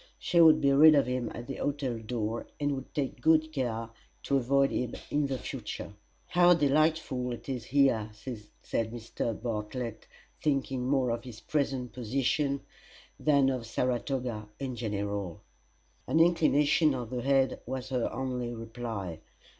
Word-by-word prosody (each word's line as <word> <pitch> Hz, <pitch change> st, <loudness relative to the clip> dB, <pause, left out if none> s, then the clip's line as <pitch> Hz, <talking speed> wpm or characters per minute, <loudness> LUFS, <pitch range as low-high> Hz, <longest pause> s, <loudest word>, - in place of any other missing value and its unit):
She 170 Hz, -2 st, +3 dB
would 160 Hz, -1 st, +8 dB
be 140 Hz, -2 st, +3 dB
rid 155 Hz, +3 st, +8 dB
of 140 Hz, -, +4 dB
him 125 Hz, -2 st, -2 dB
at 120 Hz, -, -7 dB
the 135 Hz, -, -6 dB
hotel 135 Hz, -5 st, -2 dB
door, 110 Hz, 0 st, -3 dB
and 145 Hz, -1 st, +1 dB
would 135 Hz, -1 st, -5 dB
take 140 Hz, -3 st, -2 dB
good 155 Hz, 0 st, +3 dB
care 115 Hz, -5 st, -2 dB, 0.3 s
to 140 Hz, -, +2 dB
avoid 135 Hz, +2 st, +2 dB
him 125 Hz, -2 st, -2 dB, 0.2 s
in 145 Hz, -1 st, +1 dB
the 135 Hz, -1 st, -2 dB
future. 115 Hz, -6 st, -6 dB, 0.4 s
"How 175 Hz, 0 st, +6 dB
delightful 150 Hz, -4 st, +1 dB
it 120 Hz, -, -9 dB
is 125 Hz, -4 st, -4 dB
here!" 125 Hz, -5 st, +3 dB
said 110 Hz, 0 st, -5 dB
Mr. 115 Hz, -1 st, -4 dB
Bartlett, 115 Hz, 0 st, -4 dB, 0.3 s
thinking 135 Hz, -3 st, 0 dB
more 130 Hz, -3 st, +2 dB
of 115 Hz, 0 st, -3 dB
his 120 Hz, -3 st, -9 dB
present 130 Hz, -2 st, -2 dB
position 135 Hz, +4 st, 0 dB, 0.6 s
than 140 Hz, -3 st, +4 dB
of 125 Hz, -3 st, -4 dB
Saratoga 125 Hz, -3 st, -2 dB
in 130 Hz, -2 st, -3 dB
general. 100 Hz, -5 st, -3 dB, 0.6 s
An 160 Hz, -, +2 dB
inclination 155 Hz, -3 st, +4 dB
of 120 Hz, -2 st, -5 dB
the 125 Hz, -1 st, -2 dB
head 135 Hz, 0 st, +2 dB
was 130 Hz, 0 st, -4 dB
her 125 Hz, -3 st, -1 dB
only 125 Hz, -2 st, -3 dB
reply. 115 Hz, -7 st, -5 dB
130 Hz, 150 wpm, -30 LUFS, 115-140 Hz, 0.6 s, would